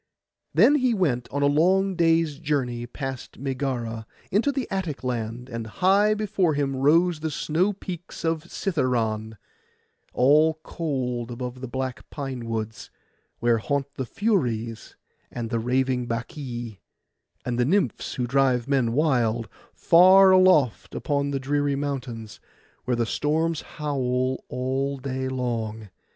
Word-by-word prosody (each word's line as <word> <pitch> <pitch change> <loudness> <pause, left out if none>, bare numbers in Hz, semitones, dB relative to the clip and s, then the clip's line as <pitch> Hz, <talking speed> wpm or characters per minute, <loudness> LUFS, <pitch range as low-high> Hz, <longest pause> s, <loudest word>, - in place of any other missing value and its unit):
Then 290 - +5
he 255 -4 +2
went 135 - 0
a 145 - -4
long 175 +7 +3
day's 165 -3 +2
journey, 130 -6 -1
past 135 0 -6
Megara, 125 -5 -3 0.2
into 220 +9 +2
the 270 -3 -3
Attic 180 -9 -3
land, 120 -1 -3
and 115 -3 -5
high 200 - +3
before 200 -6 0
him 140 -1 0
rose 160 +5 +3
the 160 +1 -2
snow 165 +6 0
peaks 180 -3 -7
of 165 0 -1
Cithæron, 115 - -1 0.7
all 150 +5 +4
cold 125 -7 -3
above 125 +1 -6
the 130 - -4
black 130 -1 -5
pine 135 -5 -5
woods, 110 -1 -4 0.5
where 120 -1 +2
haunt 140 +4 -2
the 130 - -4
Furies, 120 - -1 0.3
and 115 -2 -5
the 115 - 0
raving 125 +1 0
Bacchæ, 120 -2 -5 0.7
and 120 -1 -2
the 120 - +3
Nymphs 165 - 0
who 125 - -1
drive 130 -1 +2
men 130 -5 +1
wild, 120 -6 +1 0.2
far 190 +3 +6
aloft 150 - +4
upon 140 -1 -1
the 140 -1 -1
dreary 145 +1 0
mountains, 130 -6 -5 0.5
where 125 - +1
the 120 0 0
storms 160 +5 0
howl 130 -3 -2
all 135 +2 -2
day 130 0 -3
long. 115 -4 -3
135 Hz, 135 wpm, -25 LUFS, 120-160 Hz, 0.7 s, far